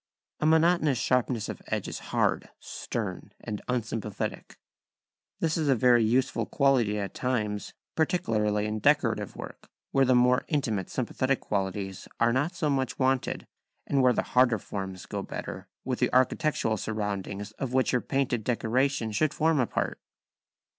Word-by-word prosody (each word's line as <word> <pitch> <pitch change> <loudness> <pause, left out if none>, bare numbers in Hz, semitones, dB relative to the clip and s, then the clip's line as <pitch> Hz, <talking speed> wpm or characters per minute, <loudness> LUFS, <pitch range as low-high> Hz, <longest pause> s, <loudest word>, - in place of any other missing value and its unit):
A 155 - +2
monotonous 160 -3 +4
sharpness 125 -2 +1
of - - -6
edge - - -2
is - - -5
hard, - - +1
stern, - - -5
and 105 -1 -5
unsympathetic. 115 -4 -3 0.8
This 165 0 +1
is 155 -3 +1
a 125 -2 +5
useful 115 0 +1
quality 130 -7 +2
at 100 -1 -3
times, 105 -5 -2 0.2
particularly 110 - +1
in 105 0 -2
decorative - - +2
work, - - -9 0.2
where 135 - +4
the 130 0 +4
more 125 +1 +4
intimate 115 - -1
sympathetic 130 +1 0
qualities 95 -1 -3
are 115 0 +4
not 145 +7 0
so 170 -3 0
much 130 -3 0
wanted, 130 -1 0 0.4
and 140 - +2
where 125 -1 +5
the - - 0
harder 125 -2 +3
forms 95 -2 -6
go - - -4
better - - -6 0.2
with 130 -1 -2
the 125 - +2
architectural 130 -3 +2
surroundings 105 -1 -3
of 130 -2 -3
which 130 0 +3
your 125 - +2
painted 135 -5 0
decoration 125 +1 0
should 140 +8 +1
form 160 -1 +2
a 125 - +2
part. - - -2
125 Hz, 150 wpm, -28 LUFS, 105-135 Hz, 0.8 s, a